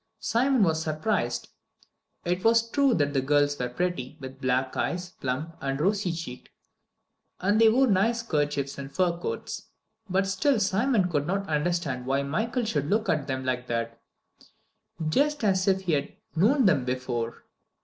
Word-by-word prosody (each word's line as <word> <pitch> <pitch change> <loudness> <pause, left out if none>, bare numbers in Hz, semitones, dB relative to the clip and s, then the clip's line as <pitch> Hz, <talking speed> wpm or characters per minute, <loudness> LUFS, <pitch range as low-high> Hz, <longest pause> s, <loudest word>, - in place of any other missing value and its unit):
Simon 235 +3 +2
was 160 -3 +2
surprised. 155 +7 -1 0.8
It 180 +1 -1
was 230 0 +4
true 280 -4 +3
the 145 - +3 0.2
girls 145 +1 +2
were 125 -1 -1
pretty, 155 -2 -3
with 135 0 -9
black 130 +1 0
eyes, 180 0 -2
plump, 145 +6 -3
and 135 0 -2
rosy 195 +2 +1
cheeked, 160 -7 -7 0.9
and 205 +4 +2
they 225 - +8
wore 260 +4 +4
nice 230 +2 +2
kerchiefs 145 -7 -1
and 135 0 -7
fur 175 +1 +1
coats, - - -5 0.4
but 190 +1 +2
still 215 +7 +1
Simon 205 +1 +2
could 150 -4 -1
not 195 +2 -1
understand 150 -5 -1
why 135 +1 +1
Michael 220 - -1
should 150 -9 -1
look 215 +2 +1
at 150 -3 0
them 130 -1 -3
like 125 -1 -2
that 115 0 -3 1.1
just 285 - +1
as 190 -2 +2
if 190 -1 +3
he 180 -4 -1
had 140 -1 -1 0.2
known 235 - +4
them 150 -9 +4
before. 125 -2 -3
170 Hz, 160 wpm, -27 LUFS, 140-210 Hz, 1.1 s, they